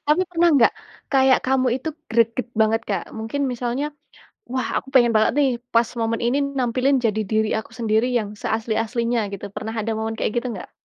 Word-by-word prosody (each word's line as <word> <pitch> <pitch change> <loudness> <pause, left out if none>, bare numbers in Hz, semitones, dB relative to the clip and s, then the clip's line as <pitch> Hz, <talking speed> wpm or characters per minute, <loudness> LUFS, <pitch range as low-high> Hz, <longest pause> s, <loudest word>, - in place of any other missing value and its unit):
Tapi 305 +5 +3
pernah 340 0 +3
enggak, 270 -7 +5 0.4
kayak 265 -1 +5
kamu 260 -1 +2
itu 270 - -5 0.2
greget 230 +2 +1
banget, 220 +1 +3
Kak? 195 -4 -1
Mungkin 225 +6 -2
misalnya, 250 +4 -2 0.6
wah 260 0 -1
aku - - -5
pengen 240 -4 +4
banget 215 - +4
nih 275 -2 +4 0.2
pas 230 0 +4
momen 225 0 0
ini 260 +4 +1
nampilin 255 +2 +2
jadi 220 -2 0
diri 220 0 +2
aku 220 +1 -5
sendiri 225 +1 +1
yang 210 -4 -1
seasli-aslinya 225 0 -1
gitu 200 0 -6
pernah 220 +1 -4
ada 225 0 -2
momen 220 0 -3
kayak - - 0
gitu 250 - -6
enggak? 190 - -8
230 Hz, 180 wpm, -22 LUFS, 220-260 Hz, 0.6 s, enggak